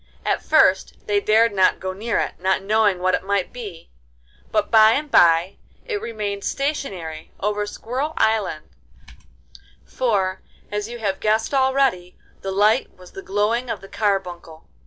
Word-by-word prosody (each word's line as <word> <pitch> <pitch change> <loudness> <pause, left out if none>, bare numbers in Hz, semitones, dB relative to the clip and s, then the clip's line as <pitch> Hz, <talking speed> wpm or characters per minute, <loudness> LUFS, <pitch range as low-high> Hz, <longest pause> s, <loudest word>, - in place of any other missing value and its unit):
At - - 0
first - - +3
they 415 -2 +1
dared 225 - +3
not 190 -2 +3
go 185 0 -4
near 215 +4 -2
it, - - -2
not 190 +1 0
knowing 205 -2 +2
what 185 0 +1
it - - 0
might 200 -1 -1
be, 205 -9 -9 0.6
but - - 0
by 220 0 +7
and 295 +2 -2
by 170 +2 +4 0.3
it 425 -4 -3
remained 205 -3 -4
stationary 190 - -4
over 210 +1 -1
Squirrel 265 +9 -4
Island, 220 -8 0 1.2
for, 195 -7 -1 0.3
as 210 +1 -3
you 240 - -7
have 200 -4 -2
guessed 220 +4 0
already, 265 -9 +1 0.2
the 195 - -4
light 210 +5 +2
was 180 -1 -15
the 195 - -9
glowing 215 +6 -1
of - - -3
the 195 - -13
carbuncle. 180 -6 -3
205 Hz, 155 wpm, -22 LUFS, 190-230 Hz, 1.2 s, by